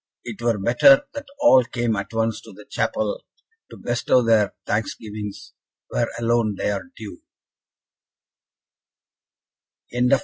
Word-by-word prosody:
It 115 -2 -8
were 115 -2 +1
better 260 - +5
that 285 0 -7
all 130 - +6
came 120 -1 -2
at 100 -1 -5
once 115 -1 -1
to - - -14
the 105 +2 -14
chapel, - - -2 0.5
to - - -12
bestow 120 +1 +1
their 110 -3 +2
thanksgivings 105 -1 -5 0.4
where - - 0
alone 115 -2 +1
they - - -1
are 100 -1 -4
due." 105 -5 -9
115 Hz, 115 wpm, -22 LUFS, 105-120 Hz, 0.5 s, all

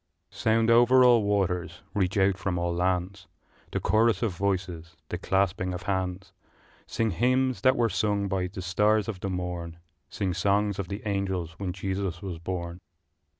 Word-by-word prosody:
I. - - -21
Sound 115 +1 +2
over 120 +2 +6
all 120 -2 +6
waters, 90 -4 -1
reach 95 -1 0
out 95 0 +3
from 90 -1 -2
all 85 0 -1
lands, 90 +1 -1 0.4
The - - -2
chorus 110 -1 +2
of 105 -6 -1
voices, 90 -3 -3
the 90 - -4
clasping 95 -1 0
of 90 - -7
hands; 95 0 -3 0.5
Sing 115 -1 0
hymns 130 +6 +1
that 130 0 +4
were 120 -1 +3
sung 100 0 0
by 95 -2 -1
the 95 0 -7
stars 105 +3 +2
of 105 -5 -4
the 95 - -3
morn, 90 -2 -4 0.3
Sing 95 -3 -2
songs 100 +3 +1
of 95 - -3
the 100 +2 -6
angels 95 -4 -2
when 95 -2 -2
Jesus 95 -1 -3
was 90 -4 -6
born! 85 0 -5
95 Hz, 170 wpm, -27 LUFS, 90-105 Hz, 0.5 s, over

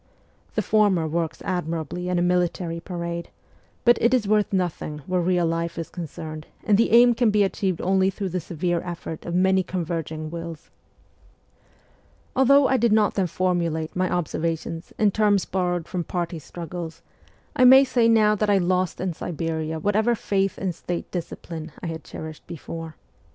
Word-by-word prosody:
The - - +1
former 205 -6 +3
works 165 0 -2
admirably 175 -1 -3
in 180 - +1
a 175 - +2
military 175 -1 0
parade, 170 -1 -5 0.6
but 240 -1 +6
it 235 +2 +4
is 225 -5 0
worth 210 0 +2
nothing 170 -5 -2
where 185 -1 0
real 175 0 +2
life 165 0 -2
is 165 -2 -5
concerned 155 -2 -7 0.2
and 210 - +3
the 230 +3 +3
aim 240 +1 +7
can 235 -1 +2
be 210 -1 +3
achieved 190 -2 -1
only 190 +1 +3
through 195 0 -4
the 180 +1 -2
severe 170 +1 -2
effort 170 -2 -6
of 170 - -2
many 190 +1 +4
converging 160 -3 -4
wills. 170 -2 -7 1.6
Although 270 +1 +5
I 265 - +3
did 235 -1 +2
not 215 -1 +3
then 190 -2 +1
formulate 170 -3 -1
my 185 0 +1
observations 165 -1 -2
in 210 -2 +3
terms 205 -2 +2
borrowed 175 -3 -1
from 180 -2 -3
party 170 -1 -3
struggles, 170 +1 -7 0.5
I 255 - +4
may 265 +2 +9
say 245 -3 +2
now 215 -2 +5
that 210 0 0
I 200 - +5
lost 185 -1 0
in 185 -1 -2
Siberia 160 -1 -3
whatever 215 +6 +2
faith 195 -2 0
in 190 -2 -2
State 175 +1 -5
discipline 165 -2 -6
I - - -7
had 160 -1 -5
cherished 155 -1 -9
before. 165 -1 -7
180 Hz, 165 wpm, -24 LUFS, 165-200 Hz, 1.6 s, may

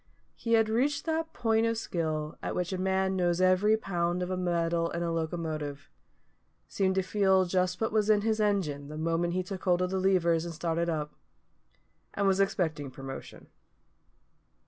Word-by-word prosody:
He 230 - -2
had 225 -1 +5
reached 260 +7 0
that 320 0 -1
point 225 -1 +1
of 230 0 0
skill 155 -6 -2
at - - -3
which 180 +1 -2
a 185 - -3
man 190 0 +1
knows 175 -1 +1
every 185 +4 +4
pound 175 -3 -1
of 185 0 -2
metal 170 -1 0
in 170 0 -3
a 170 - -1
locomotive; 155 -3 -4 0.8
seemed 190 -1 0
to 190 - +2
feel 190 -1 +3
just 180 0 0
what 220 - 0
was 215 -1 +1
in 210 -1 +5
his 220 0 0
engine 180 -10 0
the 155 +1 -7
moment 165 +2 0
he 185 0 0
took 185 0 -7
hold 180 -1 +3
of 180 0 0
the 190 - 0
levers 175 -4 +2
and 170 -1 -6
started 170 +1 -1
up; 150 -2 -3 1.0
and 200 - 0
was 195 0 +3
expecting 160 -7 0
promotion. 135 0 -9
180 Hz, 175 wpm, -29 LUFS, 165-195 Hz, 1.0 s, had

